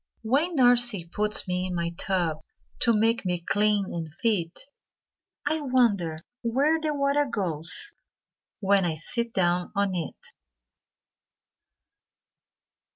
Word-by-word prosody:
When 290 Hz, +10 st, +1 dB
Nursie 240 Hz, -, +3 dB
puts 210 Hz, 0 st, +2 dB
me 180 Hz, 0 st, -1 dB
in 180 Hz, -, -4 dB
my 170 Hz, 0 st, -2 dB
tub 170 Hz, -5 st, -1 dB, 0.4 s
To 235 Hz, -, +3 dB
make 225 Hz, +2 st, +2 dB
me 180 Hz, -2 st, -1 dB
clean 205 Hz, +3 st, +1 dB
and 165 Hz, -2 st, -5 dB
fit, 180 Hz, -2 st, -2 dB, 0.8 s
I 310 Hz, +2 st, 0 dB
wonder 225 Hz, -, +1 dB, 0.2 s
where 280 Hz, +7 st, +1 dB
the 310 Hz, -1 st, -1 dB
water 285 Hz, 0 st, +1 dB
goes 180 Hz, -, +1 dB, 0.7 s
When 195 Hz, -1 st, +3 dB
I 170 Hz, -3 st, -1 dB
sit 235 Hz, +9 st, -2 dB
down 180 Hz, -3 st, 0 dB
on 200 Hz, -1 st, +1 dB
it. 170 Hz, -4 st, -4 dB
205 Hz, 115 wpm, -26 LUFS, 175-245 Hz, 0.8 s, Nursie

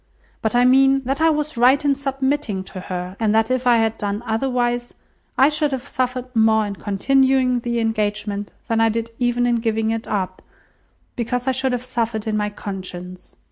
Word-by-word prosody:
But 220 Hz, +1 st, -1 dB
I 245 Hz, 0 st, +5 dB
mean, 270 Hz, +1 st, +5 dB
that 270 Hz, +4 st, -2 dB
I 325 Hz, -, +5 dB
was 300 Hz, -3 st, -1 dB
right 260 Hz, +5 st, +4 dB
in 285 Hz, -, +4 dB
submitting 270 Hz, -6 st, -2 dB
to 190 Hz, 0 st, -9 dB
her, 180 Hz, 0 st, -5 dB
and 220 Hz, -1 st, +1 dB
that 225 Hz, +2 st, +2 dB
if 255 Hz, 0 st, 0 dB
I 240 Hz, -1 st, +6 dB
had 225 Hz, 0 st, 0 dB
done 205 Hz, +2 st, -3 dB
otherwise, 240 Hz, +1 st, -1 dB, 0.4 s
I 265 Hz, -, +6 dB
should 300 Hz, -1 st, 0 dB
have 265 Hz, +1 st, -4 dB
suffered 255 Hz, -1 st, -3 dB
more 220 Hz, -1 st, +4 dB
in 200 Hz, -1 st, -5 dB
continuing 260 Hz, +4 st, +2 dB
the 235 Hz, 0 st, -2 dB
engagement 210 Hz, -3 st, -2 dB, 0.2 s
than 225 Hz, -1 st, +1 dB
I 225 Hz, -, +4 dB
did 230 Hz, +1 st, -3 dB
even 245 Hz, 0 st, +1 dB
in 240 Hz, -1 st, +2 dB
giving 225 Hz, -1 st, 0 dB
it 225 Hz, 0 st, -3 dB
up, 185 Hz, -3 st, -3 dB, 0.7 s
because 245 Hz, +2 st, -2 dB
I -, -, +4 dB
should 260 Hz, 0 st, 0 dB
have 250 Hz, 0 st, -3 dB
suffered 230 Hz, -3 st, -2 dB
in 220 Hz, -1 st, -1 dB
my 210 Hz, 0 st, 0 dB
conscience. 185 Hz, -3 st, -8 dB
235 Hz, 190 wpm, -21 LUFS, 215-260 Hz, 0.7 s, I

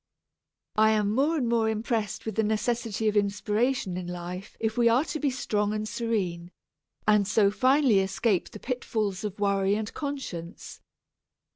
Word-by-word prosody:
I 220 Hz, 0 st, +6 dB
am 210 Hz, -1 st, +1 dB
more 290 Hz, +7 st, +2 dB
and 255 Hz, -5 st, 0 dB
more 230 Hz, -1 st, +2 dB
impressed 220 Hz, -1 st, -2 dB
with 220 Hz, -, -3 dB
the 220 Hz, -, +1 dB
necessity 220 Hz, 0 st, -1 dB
of 210 Hz, -, +1 dB
inspiration 205 Hz, +1 st, 0 dB
in 180 Hz, -1 st, -5 dB
life 180 Hz, +2 st, -7 dB
if 220 Hz, 0 st, -1 dB
we 240 Hz, -1 st, +4 dB
are 250 Hz, +6 st, +3 dB
to 310 Hz, -, -4 dB
be 290 Hz, -, +1 dB
strong 210 Hz, -5 st, -1 dB
and 215 Hz, 0 st, -2 dB
serene, 190 Hz, -8 st, -2 dB, 0.6 s
and 210 Hz, -2 st, +4 dB
so 210 Hz, -1 st, +3 dB
finally 260 Hz, -2 st, +4 dB
escape 190 Hz, 0 st, 0 dB
the 210 Hz, -, -10 dB
pitfalls 220 Hz, -6 st, -2 dB
of 205 Hz, -1 st, -5 dB
worry 200 Hz, -1 st, +2 dB
and 215 Hz, 0 st, -4 dB
conscience. 260 Hz, -, -6 dB
215 Hz, 160 wpm, -27 LUFS, 200-235 Hz, 0.6 s, I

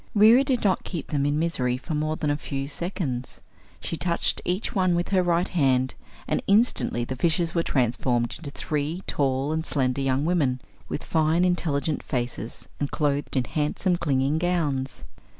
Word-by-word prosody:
Reera 225 Hz, +5 st, +7 dB
did 265 Hz, -3 st, 0 dB
not 195 Hz, -3 st, +2 dB
keep 170 Hz, -5 st, -5 dB
them 145 Hz, -1 st, +1 dB
in 145 Hz, +1 st, +1 dB
misery 130 Hz, -7 st, 0 dB
more 155 Hz, +1 st, 0 dB
than 150 Hz, -2 st, -1 dB
a -, -, +1 dB
few 140 Hz, -2 st, -4 dB
seconds, 140 Hz, -4 st, -3 dB, 0.4 s
for -, -, -13 dB
she 165 Hz, -, -2 dB
touched 170 Hz, +3 st, 0 dB
each 185 Hz, +5 st, -1 dB
one 185 Hz, -4 st, +2 dB
with 175 Hz, 0 st, -1 dB
her 190 Hz, -2 st, +3 dB
right 175 Hz, 0 st, +1 dB
hand 130 Hz, -6 st, +2 dB, 0.3 s
and -, -, 0 dB
instantly 200 Hz, -, +2 dB
the 130 Hz, -, -4 dB
fishes 170 Hz, +4 st, +1 dB
were 170 Hz, -, +2 dB
transformed 120 Hz, -4 st, 0 dB
into 155 Hz, -, -7 dB
three 150 Hz, +5 st, -3 dB
tall 135 Hz, 0 st, 0 dB
and 160 Hz, 0 st, -1 dB
slender 135 Hz, -4 st, 0 dB
young 135 Hz, +1 st, +1 dB
women, 145 Hz, -7 st, +1 dB, 0.3 s
with -, -, -4 dB
fine, 160 Hz, +2 st, +2 dB
intelligent 155 Hz, -5 st, 0 dB
faces 120 Hz, -2 st, -4 dB
and 145 Hz, -, -1 dB
clothed 145 Hz, -2 st, -1 dB
in 130 Hz, -, +3 dB
handsome, 155 Hz, +7 st, 0 dB
clinging 145 Hz, -2 st, +1 dB
gowns. 150 Hz, -7 st, -1 dB
150 Hz, 170 wpm, -25 LUFS, 135-175 Hz, 0.4 s, Reera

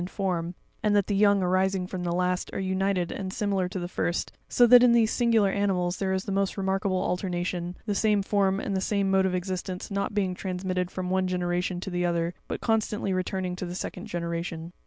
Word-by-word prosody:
in 175 Hz, -, -3 dB
form, 180 Hz, -3 st, -2 dB, 0.3 s
and 210 Hz, -1 st, +2 dB
that 200 Hz, -2 st, +3 dB
the 205 Hz, -, -1 dB
young 200 Hz, -1 st, +4 dB
arising 185 Hz, +1 st, +1 dB
from 185 Hz, 0 st, -5 dB
the 175 Hz, -, -1 dB
last 180 Hz, +1 st, 0 dB
are -, -, -3 dB
united 190 Hz, -1 st, 0 dB
and 190 Hz, -2 st, -4 dB
similar 195 Hz, -3 st, 0 dB
to 190 Hz, -, -5 dB
the 175 Hz, -1 st, -3 dB
first; 175 Hz, -1 st, -2 dB, 0.2 s
so 245 Hz, -, +5 dB
that 245 Hz, +1 st, +8 dB
in 245 Hz, -1 st, +6 dB
these 225 Hz, -2 st, +4 dB
singu 235 Hz, -2 st, +3 dB
lar 195 Hz, -1 st, +3 dB
animals 185 Hz, -3 st, 0 dB
there 190 Hz, -1 st, -1 dB
is 190 Hz, 0 st, 0 dB
the -, -, -5 dB
most 195 Hz, 0 st, 0 dB
remarkable 190 Hz, 0 st, 0 dB
alternation, 180 Hz, -1 st, -2 dB
the 210 Hz, -, 0 dB
same 210 Hz, -1 st, +2 dB
form 195 Hz, -1 st, +1 dB
and 200 Hz, -2 st, -2 dB
the 190 Hz, -, 0 dB
same 200 Hz, -1 st, 0 dB
mode 190 Hz, 0 st, +4 dB
of 185 Hz, -, -1 dB
existence 185 Hz, +1 st, -4 dB
not 200 Hz, +1 st, -2 dB
being 190 Hz, -3 st, +1 dB
transmitted 180 Hz, -1 st, -2 dB
from 185 Hz, -1 st, -4 dB
one 190 Hz, 0 st, +1 dB
generation 180 Hz, 0 st, -1 dB
to 190 Hz, -, -6 dB
the 175 Hz, 0 st, -1 dB
other, 170 Hz, 0 st, 0 dB
but -, -, -4 dB
constantly 215 Hz, -3 st, 0 dB
returning 185 Hz, 0 st, -2 dB
to 180 Hz, 0 st, -5 dB
the 175 Hz, -, -6 dB
second 185 Hz, +2 st, -5 dB
generation. 170 Hz, -2 st, -4 dB
190 Hz, 220 wpm, -27 LUFS, 180-200 Hz, 0.3 s, that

